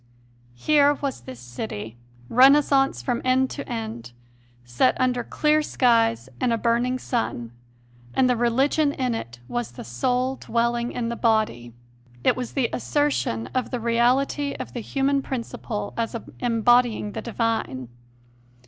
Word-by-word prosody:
Here 290 - +4
was 275 - -4
this 125 0 -10
city, 115 -3 -6 0.3
Renaissance 270 - +4
from 245 -3 -1
end 260 +1 +2
to 280 - -7
end, 220 - -5 0.5
set 120 +1 +1
under 250 -1 +1
clear 305 +5 +2
skies 230 - +2
and 245 - +1
a 230 - +2
burning 240 +2 +1
sun; 175 - -3 0.6
and 260 - +4
the 250 - +2
religion 270 +5 +2
in 255 -3 -1
it 120 - -6
was 120 -1 -3
the - - -8
soul 250 - -1
dwelling 235 +1 -1
in 235 -1 -3
the 235 - -3
body. 215 - 0 0.5
It - - +4
was 250 -2 -5
the 265 -4 +1
assertion 275 - 0
of 255 - -1
the 250 - -3
reality 250 +5 +1
of - - -7
the 240 - -4
human 275 +4 0
prin 260 -3 -3
ciple 205 -3 -6
as 230 0 -2 0.2
embodying 240 -2 +2
the 220 - -5
divine. 225 - -2
235 Hz, 145 wpm, -24 LUFS, 210-260 Hz, 0.6 s, Here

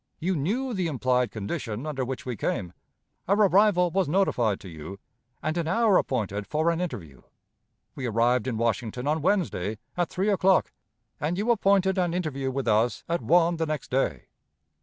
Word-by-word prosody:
You 185 +3 -1
knew 230 - -1
the 185 -4 -1
implied 125 -4 +1
condition 115 +2 -4
under 145 -4 -2
which 130 +1 -5
we 125 -2 -3
came; 90 -3 -3 0.5
our 200 - +4
arrival 200 -3 +4
was 190 -2 +1
notified 125 - +1
to - - -10
you, 80 +3 -8 0.5
and 155 - -1
an 170 -2 -1
hour 220 +2 +3
appointed 105 -5 -2
for 155 +2 +1
an 170 +1 -2
interview. 85 - -6 0.7
We 130 - -4
arrived 120 +2 +2
in 120 -4 -2
Washington 115 +1 -1
on 155 +2 0
Wednesday, 145 - 0 0.2
at 175 -2 0
three 195 +3 -1
o'clock, 190 -1 +3 0.5
and 160 +4 -1
you 215 +4 +1
appointed 195 -3 +3
an 175 -1 0
interview 140 -7 -2
with 130 -1 -3
us 110 +2 +2
at 170 +1 -1
one 170 0 +3
the 160 0 -1
next 155 -3 -4
day. 135 +1 0
155 Hz, 175 wpm, -26 LUFS, 120-180 Hz, 0.7 s, our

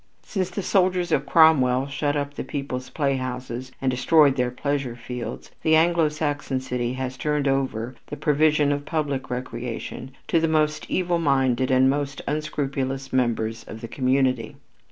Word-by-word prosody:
Since 185 -4 -2
the 185 +2 -4
soldiers 180 -1 +2
of 140 0 +1
Cromwell 135 -6 +5
shut 145 +1 -1
up 145 0 -3
the - - -5
people's 130 -3 -5
playhouses 130 -3 -3
and 130 -1 +1
destroyed 140 +2 +4
their 125 -2 +1
pleasure 135 -1 -2
fields, 120 -1 -7
the 160 0 +4
Anglo 165 -1 +4
Saxon 145 -3 -2
city 125 -1 -2
has 130 0 -4
turned 150 +2 0
over 130 -3 -1
the 145 - -6
provision 150 -1 +3
for 145 - -6
public 145 -4 -2
recreation 125 0 -5 0.2
to 165 - +3
the 165 - +1
most 155 -1 0
evil 175 -2 +1
minded 135 -4 +2
and 130 0 +4
the 135 +1 +4
most 140 -1 -4
unscrupulous 135 -3 -2
members 115 -3 0
of 110 - -9
the 115 - -5
community. 130 -2 0
135 Hz, 160 wpm, -24 LUFS, 125-150 Hz, 0.2 s, Cromwell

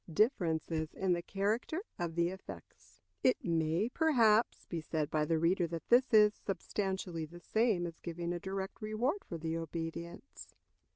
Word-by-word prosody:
Difference 170 - +2 0.3
in 190 -2 +1
the 175 - -1
Character 215 - -1 0.2
of 170 -2 -2
the 170 0 +2
Effects. 190 +1 -11 0.2
It 255 - +3
may, 165 +3 +1
perhaps, 240 -7 +3
be 170 -2 -4
said 155 -1 -2
by 155 -1 +2
the 165 +1 +1
reader 170 +2 +2
that 165 -1 -6
this 250 +2 +5
is 210 -2 +7
substantially 190 -5 -3
the 175 +3 -12
same 220 -3 +1
as 170 -1 -7
giving 170 0 -4
a 175 - -3
direct 190 +4 -5
reward 235 - -1
for 170 - -4
the 160 0 -3
obedience. 165 - -6
175 Hz, 160 wpm, -33 LUFS, 165-215 Hz, 0.3 s, is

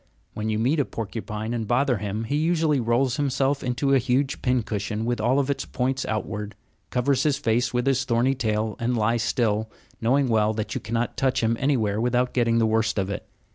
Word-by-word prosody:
When 110 +1 -3
you 110 - 0
meet 130 +8 +1
a 140 - +2
porcupine 110 0 -5
and 115 -3 -3
bother 125 -1 +2
him, 105 +2 -3
he 120 +6 -2
usually 160 -2 +2
rolls 120 +2 +1
himself 140 -1 0
into 130 +2 0
a 135 - +5
huge 130 +3 0
pincushion 110 -4 -1
with 120 -1 -1
all 125 +5 +3
its 140 - -1
points 130 +1 -2
outward, 105 -1 -3 0.3
covers 125 +2 +1
his 145 -3 +2
face 115 +2 +1
with 125 0 0
his 135 -1 +2
thorny 125 +1 +2
tail, 110 -4 -1
and 120 +1 0
lies 115 +2 +1
still, 110 -3 0 0.3
knowing 130 +4 +2
well 110 -2 +2
that 110 -1 -3
you - - -3
cannot 115 +2 -2
touch 130 -3 +1
him 115 +1 +2
anywhere 110 -7 +1
without 125 +1 +1
getting 115 -2 +2
the 115 - +3
worst 110 -1 +1
of 95 0 -1
it. 105 +2 -5
120 Hz, 200 wpm, -25 LUFS, 110-130 Hz, 0.3 s, a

